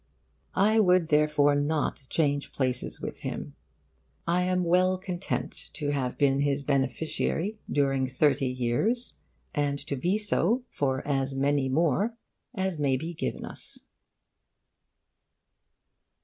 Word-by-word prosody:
I 215 +3 +4
would 180 -5 +4
therefore 150 -1 +4
not 145 +1 0
change 145 -3 0
places 130 -2 -1
with - - -6
him. - - -5 0.7
I 175 +2 +2
am 180 0 +1
well 185 +2 +3
content 185 0 -4
to 145 -2 -2
have 130 -3 -2
been 140 -1 +3
his 140 0 +1
beneficiary 155 - -1
during 135 -2 +2
thirty 135 +1 +2
years, 130 - 0 0.4
and 145 -2 0
to 140 - -2
be 175 +10 +1
so 215 +3 +2
for 135 -1 -1
as 135 -1 0
many 140 0 +1
more 170 - +1 0.4
as 190 -5 -1
may 135 -3 +2
be 165 +6 -5
given - - -3
us. - - -4
145 Hz, 120 wpm, -28 LUFS, 135-180 Hz, 0.7 s, I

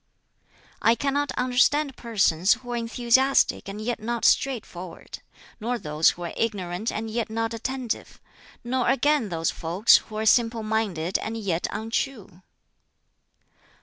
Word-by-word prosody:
"I 230 - +4
cannot 280 +1 -1
understand 265 +3 +2
persons 195 -6 +2
who 245 0 -8
are - - -1
enthusiastic 240 +1 +2
and 200 +2 -6
yet 235 +2 -3
not 235 +1 -2
straightforward; 185 -10 -1 0.4
nor 240 +3 -2
those 155 -5 +2
who 175 - -5
are 170 - -5
ignorant 205 -2 -2
and 220 +1 -4
yet 225 0 -2
not 225 +1 -2
attentive; 250 +1 -4 0.4
nor 250 +1 0
again 285 -5 +2
those 165 -2 -1
folks 175 +6 +4
who 215 - -9
are 215 +1 -2
simple 230 0 +3
minded 200 -6 -1
and 225 +1 -4
yet 185 -6 -1
untrue. 220 -3 -4
225 Hz, 135 wpm, -25 LUFS, 195-245 Hz, 0.4 s, I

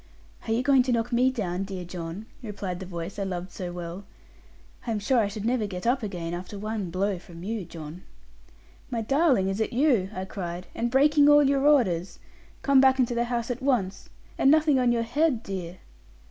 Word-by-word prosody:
'Are - - -1
you 235 +3 +1
going 275 -1 +5
to 250 0 -1
knock 230 0 0
me 250 +2 +3
down, 195 -7 -2
dear 190 -2 -6
John?' 175 +3 -6 0.2
replied 200 -5 -5
the 190 - -7
voice 175 +2 -6
I - - 0
loved 180 -1 -4
so 180 -2 -5
well; 175 +2 -6 0.8
'I - - 0
am 210 - -1
sure 240 +5 +2
I 215 - +2
should 205 +1 -6
never 235 -3 +1
get 180 0 -6
up 255 +3 +2
again, 175 -6 -4
after 180 +4 -6
one 210 -2 -3
blow 190 +2 -1
from 170 -1 -12
you, 210 -1 -3
John.' 160 +1 -9 0.9
'My 235 -3 -2
darling, 270 - +2
is 195 +2 -2
it 220 - -1
you?' 240 -8 +2
I 185 -2 -5
cried; 180 -2 -6
'and 240 - -1
breaking 290 +3 +5
all 295 0 +7
your 275 +1 +2
orders? 195 - +2 0.5
Come 275 -1 +5
back 265 -1 +5
into 250 -2 +1
the 235 0 0
house 240 0 -2
at 245 +2 -5
once: 220 -8 -1 0.3
and 270 - +5
nothing 305 -2 +4
on 250 -1 +3
your 235 -1 +1
head, 255 0 +1
dear!' 185 -2 -6
215 Hz, 205 wpm, -26 LUFS, 185-255 Hz, 0.9 s, all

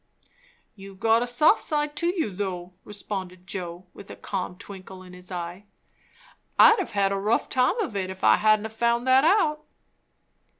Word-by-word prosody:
"You've 195 -1 -13
got 225 +2 +3
a 245 - -1
soft 300 - +3
side 295 -1 -2
to 340 - 0
you, 345 - -1
though," 185 -2 -5
responded 185 -3 -7
Joe, 180 -2 -7
with 200 - -13
a - - -8
calm 180 -1 -5
twinkle 190 -1 -11
in 180 -1 -14
his 180 +1 -11
eye. 175 +2 -6 0.9
"I'd 450 - +7
have 200 -1 0
a 195 - -1
rough 210 +4 0
time 255 - +1
of 310 - -4
it, 190 -2 -2
if 190 0 -9
I - - +6
hadn't 215 0 +2
found 235 +2 0
that 260 +1 +5
out." 310 -4 +2
205 Hz, 170 wpm, -25 LUFS, 185-250 Hz, 0.9 s, I'd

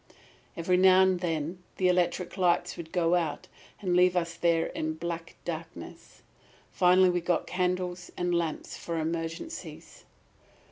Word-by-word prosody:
"Every 180 +2 +2
now 185 0 +6
and 190 -1 +2
then 165 0 -3 0.2
the 185 - +2
electric 180 0 +1
lights 175 -2 +1
would 160 -1 -9
go 170 -1 +2
out 165 -4 -1 0.3
and 185 -3 0
leave 180 0 +4
us 170 -1 -1
there 170 -1 +2
in 155 0 -3
black 170 0 -5
darkness. 165 -1 -8 0.5
Finally 180 0 +5
we 175 0 -1
got 175 0 0
candles 180 0 -2
and 175 0 0
lamps 170 -2 -2
for 170 -1 -5
emergencies. 165 - -5
175 Hz, 140 wpm, -28 LUFS, 165-180 Hz, 0.5 s, now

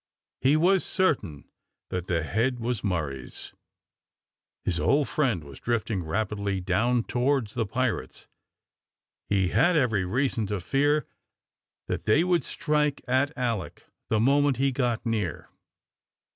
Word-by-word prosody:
He 140 +4 +4
was 185 +3 +3
certain 140 - 0 0.4
that 90 0 -3
the 85 -3 0
head 120 +9 0
was 120 -2 -2
Murray's. 75 - -4 1.1
His 85 -2 -1
old 145 0 +2
friend 125 - 0
was 70 -2 -12
drifting 115 -4 -1
rapidly 100 +3 -2
down 110 +7 +1
towards 125 -3 0
the 115 -3 -1
pirates. 130 +2 -2 1.0
He 95 -3 +2
had 175 - +3
every 115 -9 +2
reason 115 +1 0
to 105 0 -2
fear 145 - +1 0.8
that - - -4
they 145 +10 +4
would 180 -1 +2
strike 150 -2 0
at 130 +3 +2
Alick 120 -6 -3 0.2
the 110 - +2
moment 140 +2 +3
he 135 +1 +2
got 125 -3 -1
near. 105 -8 -2
120 Hz, 130 wpm, -27 LUFS, 100-140 Hz, 1.1 s, He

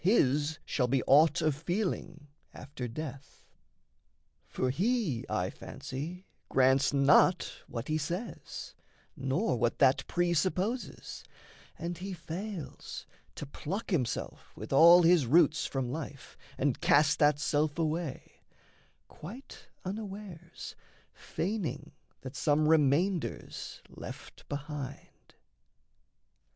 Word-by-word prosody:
His 150 - +3
shall 125 -3 0
be 130 0 +1
aught 150 +3 +5
of 155 -1 +3
feeling 170 -2 -3 0.3
after 135 -3 -6
death. 135 +2 -8 1.0
For 130 - -1
he, 190 - 0
I - - -1
fancy, 170 +8 -7 0.2
grants 130 +1 +4
not 145 +6 +4
what 115 +2 -5
he 155 0 0
says, 175 +9 -5 0.4
Nor 135 - 0
what 120 0 +1
that 135 -1 +4
presupposes, 185 +7 -1 0.5
and 170 +1 -4
he 190 +1 -5
fails 175 +2 -6 0.3
To - - -6
pluck 185 +10 -5
himself 130 -10 -2
with - - -6
all 170 +5 +8
his 165 -6 +5
roots 155 +2 +4
from 130 -3 -2
life 145 -2 -7 0.2
And 135 -3 0
cast 145 0 +4
that 145 -1 +5
self 145 +1 0
away, 160 -3 -3 0.7
quite 230 - -11 0.2
unawares 195 -4 -7 0.4
Feigning 160 - -3 0.3
that 130 +1 -8
some 150 +1 +2
remainder's 160 +4 +1
left - - -10
behind. 145 -2 -7
155 Hz, 105 wpm, -31 LUFS, 140-175 Hz, 1.0 s, all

